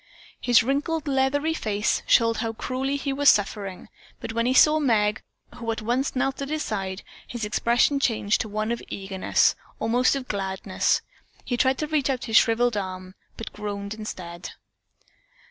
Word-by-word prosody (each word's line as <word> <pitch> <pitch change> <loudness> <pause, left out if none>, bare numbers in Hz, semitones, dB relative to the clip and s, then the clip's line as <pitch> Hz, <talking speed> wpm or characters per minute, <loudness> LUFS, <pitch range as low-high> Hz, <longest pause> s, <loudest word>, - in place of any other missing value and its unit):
His 240 -2 +4
wrinkled, 295 +5 -1
leathery 280 +3 +1
face 215 -8 -1
showed 230 -1 +4
how 225 -1 -2
cruelly 260 +4 -2
he 280 -1 -2
was 285 +1 +5
suffering, 200 -2 0 0.3
but 225 -1 -6
when 230 +1 0
he 255 - +2
saw 305 +3 +6
Meg, 215 -6 +2 0.4
who 230 -2 -3
at 225 - -5
once 250 +5 -1
knelt 270 +2 -1
at 275 - -4
his 310 0 -1
side, 195 -2 -4 0.2
his 240 -3 -4
expression 240 +6 +2
changed 215 -5 +1
to 220 - -5
one 215 +2 -2
of 235 - -2
eagerness, 195 -1 +1 0.3
almost 245 +4 +2
of 265 -2 -5
gladness. 190 -1 -1 0.4
He 245 - -1
tried 260 +2 +2
to 305 - -2
reach 295 -3 0
out 260 -2 -2
his 225 -2 -2
shriveled 235 0 +3
arm, 185 -1 -5 0.2
but 225 - -7
groaned 205 -1 -5
instead. 180 -5 -7
230 Hz, 165 wpm, -25 LUFS, 210-270 Hz, 0.4 s, saw